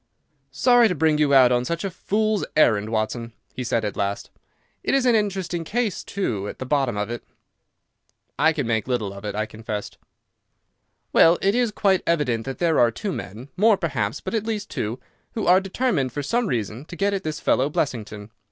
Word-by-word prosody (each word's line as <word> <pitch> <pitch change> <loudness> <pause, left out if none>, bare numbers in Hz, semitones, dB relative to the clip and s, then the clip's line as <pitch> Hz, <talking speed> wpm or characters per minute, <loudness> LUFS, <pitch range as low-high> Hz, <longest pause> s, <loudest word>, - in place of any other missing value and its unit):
"Sorry 245 - +4
to 180 - -1
bring 155 -1 +2
you 150 -2 +3
out 130 -3 +6
on 120 0 +2
such 170 +6 -3
a 195 - -2
fool's 215 +3 0
errand, 110 -8 +4
Watson," 115 +1 -2 0.2
he 130 - -4
said 115 -2 0
at 105 - -3
last. 100 0 -3 0.5
"It - - +1
is 270 -2 +2
an 245 - +4
interesting 190 -5 -1
case, 220 +2 -2
too, 110 - -3
at - - -7
the 130 - -5
bottom 135 -5 0
of 105 +2 -2
it." 120 - -5 1.2
"I 160 +3 +5
can 145 -4 -2
make 110 -2 -1
little 115 -6 -1
of 100 - -10
it," 105 - -4
I 110 0 -1
confessed. 110 -1 -6 1.1
"Well, 165 +1 +6
it 195 +1 +3
is 245 0 +2
quite 195 -2 +2
evident 130 -9 +1
that 135 - -4
there 165 -3 +2
are 120 - +5
two 195 - -4
men—more, 180 - 0
perhaps, 120 - -2
but - - -5
at 220 -2 0
least 210 -2 -3
two—who 125 - -6
are 185 +2 +5
determined 195 - -1
for 145 - -3
some 235 - 0
reason 115 - -3
to 170 - -9
get 200 +4 0
at 195 - -1
this 155 -1 -3
fellow 135 +3 +2
Blessington. 110 -7 -3
145 Hz, 195 wpm, -23 LUFS, -, 1.2 s, out